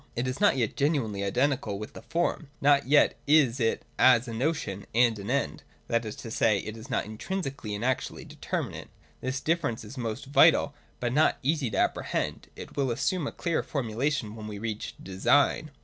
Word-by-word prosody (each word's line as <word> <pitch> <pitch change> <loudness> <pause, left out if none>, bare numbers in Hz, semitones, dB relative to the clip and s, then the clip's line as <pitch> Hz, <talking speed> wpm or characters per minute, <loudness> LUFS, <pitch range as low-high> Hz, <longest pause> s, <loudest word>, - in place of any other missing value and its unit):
It 120 +2 -1
is 130 +8 -4
not 205 -9 +5
yet 115 -4 0
genuinely 130 -9 0
identical 125 0 0
with 105 +1 -7
the - - -9
form: 165 -3 -1
not 140 -1 +4
yet 145 +1 +4
is 140 -4 +4
it 115 -2 0
as 125 -1 +6
a 115 - -5
notion 120 -6 -2
and 115 -2 +4
an 100 +2 -6
end; 140 +2 -1 0.3
that 115 0 +1
is 110 - -5
to 115 - -6
say, 110 -2 +3
it 110 +2 -5
is 115 +4 -11
not 125 - 0
intrinsically 135 - -4
and 105 +4 -3
actually 130 0 -2
determinate. - - -5 0.3
This 130 +1 -2
difference 160 -10 0
is 125 +5 -9
most 115 +3 -4
vital, 145 +1 +5 0.3
but 120 0 -1
not 150 +3 +3
easy 145 -2 +1
to - - -3
apprehend: - - -1
it - - -10
will 140 -2 +1
assume 155 - 0
a - - -3
clearer 170 -2 -1
formulation 125 -2 -2
when 110 -1 -7
we 105 -1 -6
reach 110 0 -4
Design. 140 +11 +2
125 Hz, 190 wpm, -28 LUFS, 110-145 Hz, 0.3 s, as